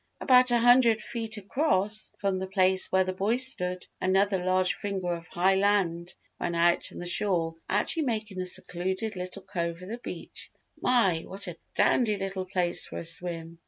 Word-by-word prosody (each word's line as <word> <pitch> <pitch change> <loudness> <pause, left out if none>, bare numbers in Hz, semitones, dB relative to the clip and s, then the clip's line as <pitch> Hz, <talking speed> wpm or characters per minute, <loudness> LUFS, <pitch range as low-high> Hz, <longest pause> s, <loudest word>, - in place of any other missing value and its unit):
About 255 -1 +5
a 240 - +4
hundred 240 -1 +5
feet 225 0 -5
across 210 -2 0
from 195 -2 -1
the 190 - -4
place 190 -1 +2
where 190 0 +4
the 185 0 -3
boy 200 +6 0
stood, 180 -9 0 0.2
another 190 0 +2
large 185 0 +2
finger 190 -3 -3
of 165 -1 -7
high 185 +4 +2
land 190 -4 +1 0.2
ran 170 - -2
out 170 +1 +2
from - - -11
the 175 - -6
shore 175 -3 0 0.2
actually 210 - +1
making 215 -6 -3
a - - -3
secluded 185 +4 -2
little 185 +2 -6
cove 170 -3 -4
of 185 - -9
the 235 +2 -5
beach. - - -8 0.3
"My, 195 -10 +2
what 195 +1 -2
a 175 -2 -6 0.2
dandy 215 -5 +2
little 195 -1 -4
place 180 -2 +1
for - - -8
a - - -5
swim! 165 0 -1
190 Hz, 180 wpm, -27 LUFS, 180-215 Hz, 0.3 s, About